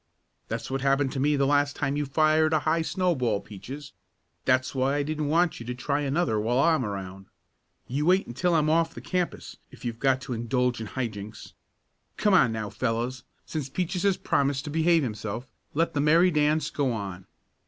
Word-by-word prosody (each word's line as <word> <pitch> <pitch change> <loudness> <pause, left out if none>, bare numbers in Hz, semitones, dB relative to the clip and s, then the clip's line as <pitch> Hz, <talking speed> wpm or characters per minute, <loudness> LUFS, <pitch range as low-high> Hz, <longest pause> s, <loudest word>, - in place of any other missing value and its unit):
"That's 115 +3 -4
what 135 0 -1
happened 135 0 +2
to 135 - -3
me 145 +2 +2
the 140 -1 +2
last 145 0 +2
time 140 - -1
you 145 -1 -1
fired 155 +2 +3
a 155 - +3
high 160 +1 +1
snowball, 155 - 0
Peaches. 135 +9 -9 0.5
That's 130 0 +2
why 135 +1 +1
I 145 - +1
didn't 155 0 -2
want 165 +3 +2
you 115 - -8
to 125 - -3
try 140 +3 -1
another 140 -6 0
while 115 +4 0
I'm 160 -2 +3
around. 95 -2 -6 0.6
You 145 +5 -1
wait 185 +2 +4
until 170 +8 0
I'm 155 -1 +3
off 165 +1 +2
the - - -6
campus 180 -1 -3
if - - -13
you've 115 -1 -4
got 130 -1 +2
to 130 - -5
indulge 120 +1 0
in 110 - -5
high 125 +5 -2
jinks. 105 -1 -8 0.6
Come 210 - +2
on 135 -11 +5
now, 110 -2 -4
fellows, 120 +1 -2 0.2
since 150 -4 -4
Peaches 180 +4 -2
has 200 -2 +2
promised 140 0 0
to 150 - -5
behave 165 +1 +3
himself, 110 +1 -4 0.3
let 165 +3 +1
the 145 - +1
merry 165 +5 +5
dance 150 -1 +1
go 140 -3 0
on. 95 -4 -6
140 Hz, 195 wpm, -27 LUFS, 120-155 Hz, 0.6 s, on